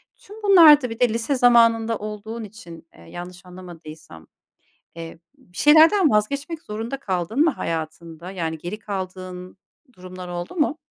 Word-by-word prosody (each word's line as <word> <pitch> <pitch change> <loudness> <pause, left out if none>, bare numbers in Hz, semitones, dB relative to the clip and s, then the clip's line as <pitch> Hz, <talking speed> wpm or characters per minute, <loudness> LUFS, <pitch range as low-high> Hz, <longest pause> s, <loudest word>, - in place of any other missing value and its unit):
Tüm 425 +1 -15
bunlarda 310 - +7
bir 225 - -8
de 245 -2 +3
lise 230 +5 -2
zamanında 230 -2 +3
olduğun 215 +2 -7
için, 170 -6 -13
eee, - - -18
yanlış 175 - -11
anlamadıysam, 160 - -13 0.7
eee, 165 0 -9 0.2
bir 180 - -17
şeylerden 320 +4 +5
vazgeçmek 280 +10 -2
zorunda 225 +5 -6
kaldın 190 - -3
mı 330 - +3
hayatında? 165 - -6
Yani 165 -4 -4
geri 175 +7 -7
kaldığın 185 -2 -7 0.3
durumlar 185 -2 -11
oldu 175 - -7
mu? 305 0 0
205 Hz, 135 wpm, -22 LUFS, 175-245 Hz, 0.7 s, bunlarda